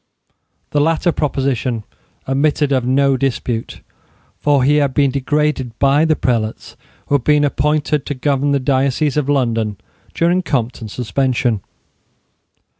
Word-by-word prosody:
The 145 - +2
latter 165 +3 +2
proposition 130 -6 -1 0.4
admitted 145 +2 +1
of 130 -2 +2
no 135 +2 +2
dispute: 125 -3 -3 0.6
for 145 -3 +2
he 145 +3 +3
had 140 -3 +1
been 140 -2 +3
degraded 140 -3 -1
by 140 +3 +3
the 160 -1 +2
prelates 115 -5 -2 0.3
who - - -3
had 140 -4 +2
been 150 +1 +3
appointed 150 0 0
to 145 - -3
govern 140 +1 0
the 140 - +2
diocese 135 +2 +1
of 145 -2 0
London 115 -7 0 0.4
during 175 +2 +2
Compton's 125 - -3
suspension. 125 -2 0
140 Hz, 130 wpm, -18 LUFS, 125-150 Hz, 0.6 s, he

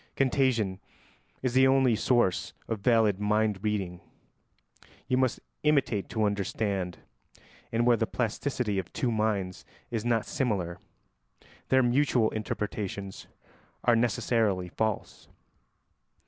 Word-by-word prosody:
Contagion 125 -8 +1 0.6
is 130 -2 0
the 130 +1 +6
only 130 -3 +4
source 120 -5 +1
of 115 -2 -2
valid 110 -3 +3
mind 105 -1 +1
reading: 95 -5 -2 1.1
you 130 - +2
must 130 -1 +1 0.2
imitate 140 -9 +1
to 110 - -1
understand, 100 -3 -1 0.7
and 115 +1 +1
where 120 -1 +5
the 110 - 0
plasticity 115 -2 -1
of 90 -2 -6
two 125 - 0
minds 105 -4 -1 0.3
is 115 -2 -2
not 115 -2 +1
similar 95 -10 -1 0.9
their 130 0 +5
mutual 120 -2 +2
interpretations 100 -2 -4 0.6
are 120 - +4
necessarily 110 -5 +1
false. 110 +3 -3
110 Hz, 110 wpm, -28 LUFS, 100-120 Hz, 1.1 s, the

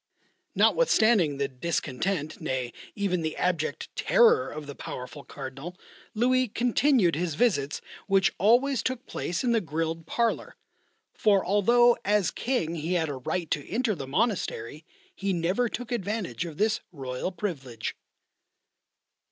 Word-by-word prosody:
Notwithstanding 220 - +4
the 140 0 0
discontent 155 +3 -2
nay, 130 -5 -2 0.2
even 195 -4 0
the 160 -1 -3
abject 170 -4 -1
terror 465 -2 +4
of 150 0 -7
the 145 - -7
powerful 130 +2 -7
Cardinal, 140 +6 -8 0.4
Louis 255 +3 +3
continued 240 - +2
his 165 -1 -2
visits, 150 - +1 0.3
which 195 -2 +3
always 240 +6 +4
took 255 +1 -3
place 175 +6 -3
in 245 - +2
the 230 -1 +3
grilled 165 -1 -3
parlour: 235 +5 -1 0.6
for 200 -3 +3
although 235 +5 +5
as 205 -2 +2
King 240 -11 -1
he 165 +2 -2
had 165 -3 +1
a 140 - -4
right 165 +6 -3
to 145 -3 -2
enter 230 +1 +1
the 140 -7 -6
monastery 155 - -1 0.3
he 195 0 -2
never 185 +8 +1
took 245 +2 -6
advantage 210 -5 -2
of 160 -3 -8
this 215 +1 +2
royal 135 +2 -4
privilege. 135 - -4
180 Hz, 135 wpm, -27 LUFS, 150-230 Hz, 0.6 s, although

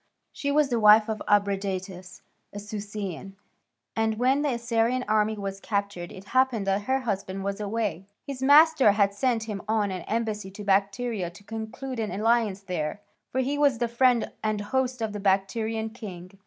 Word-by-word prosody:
She 285 - -2
was 295 -1 +3
the 240 -2 +1
wife 215 +1 +7
of 215 -1 -3
Abradatas, 195 -2 -1 0.3
a - - -9
Susian, 205 -2 -6 0.6
and 220 -1 0
when 260 +4 +2
the 295 - +1
Assyrian 235 +2 0
army 215 0 +2
was 195 -1 -5
captured 200 -4 -3
it 195 +2 -12
happened 255 -5 +2
that 195 +1 0
her 265 +1 +1
husband 195 -4 -3
was 200 +1 -3
away: 205 -4 -2 0.2
his 275 -2 -6
master 285 -4 +6
had 200 -1 +2
sent 230 +1 0
him 210 -3 -5
on 215 -2 +1
an 185 -1 -4
embassy 215 -3 -2
to 195 +2 -9
Bactria 200 0 0
to 175 +4 -16
conclude 225 +4 -6
an 215 -2 -1
alliance 220 -2 +1
there, 180 -2 -3 0.3
for 260 - +1
he 280 +3 -1
was 285 -4 +4
the 240 0 0
friend 240 0 +2
and 215 -1 0
host 255 +2 -1
of 215 -2 -2
the 210 - -4
Bactrian 220 +3 0
king. 185 -6 -9
215 Hz, 175 wpm, -26 LUFS, 195-235 Hz, 0.6 s, wife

